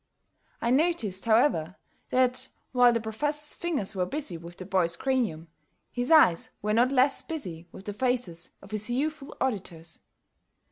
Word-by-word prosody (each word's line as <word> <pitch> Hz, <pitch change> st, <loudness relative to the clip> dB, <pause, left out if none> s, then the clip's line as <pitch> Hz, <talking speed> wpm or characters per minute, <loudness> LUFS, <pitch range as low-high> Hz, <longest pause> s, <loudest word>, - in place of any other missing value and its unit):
I 235 Hz, -, +1 dB
noticed, 255 Hz, -, +1 dB
however, 220 Hz, -, +2 dB, 0.3 s
that 255 Hz, 0 st, +2 dB, 0.2 s
while 245 Hz, -1 st, +5 dB
the 230 Hz, -, 0 dB
Professor's 295 Hz, +7 st, -1 dB
fingers 295 Hz, -, +1 dB
were 180 Hz, -2 st, -1 dB
busy 285 Hz, -, -2 dB
with 170 Hz, +1 st, -10 dB
the 185 Hz, -, -7 dB
boy's 180 Hz, -3 st, +1 dB
cranium, 220 Hz, -9 st, -1 dB, 0.4 s
his 245 Hz, 0 st, -3 dB
eyes 310 Hz, -, +5 dB
were 210 Hz, 0 st, 0 dB
not 240 Hz, +4 st, +3 dB
less 270 Hz, +1 st, +4 dB
busy 180 Hz, -, -6 dB
with 190 Hz, -, -12 dB
the 205 Hz, -, -4 dB
faces 245 Hz, -8 st, -1 dB
of 195 Hz, -, -14 dB
his 215 Hz, +1 st, -2 dB
youthful 280 Hz, +3 st, -3 dB
auditors. 175 Hz, -9 st, -3 dB
230 Hz, 150 wpm, -27 LUFS, 185-265 Hz, 0.4 s, while